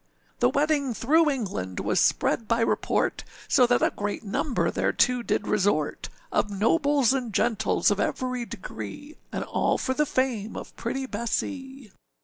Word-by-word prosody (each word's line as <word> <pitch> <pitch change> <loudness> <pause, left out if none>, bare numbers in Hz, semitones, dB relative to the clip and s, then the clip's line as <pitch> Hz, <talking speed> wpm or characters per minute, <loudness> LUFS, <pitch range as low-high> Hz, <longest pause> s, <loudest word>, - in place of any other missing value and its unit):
The 120 - +4
wedding 285 - +1
through 305 +9 +3
England 185 - -3
was - - +1
spread 225 - +2
by 230 +1 +1
report, - - 0 0.2
So 250 - +5
that 245 0 +2
a - - +2
great 205 +2 -3
number 235 +6 0
thereto 250 -1 +2
did - - -1
resort 195 -7 0 0.2
Of 210 - +1
nobles 270 - +2
and 250 -4 -2
gentles 220 -1 +2
of 205 - 0
every 255 -2 -1
degree, 185 - -8
And - - -3
all - - 0
for 260 - -1
the 300 +2 +1
fame 240 -6 -1
of - - -9
pretty 265 +3 -3
Bessee. 265 +2 -4
245 Hz, 150 wpm, -26 LUFS, 210-270 Hz, 0.2 s, So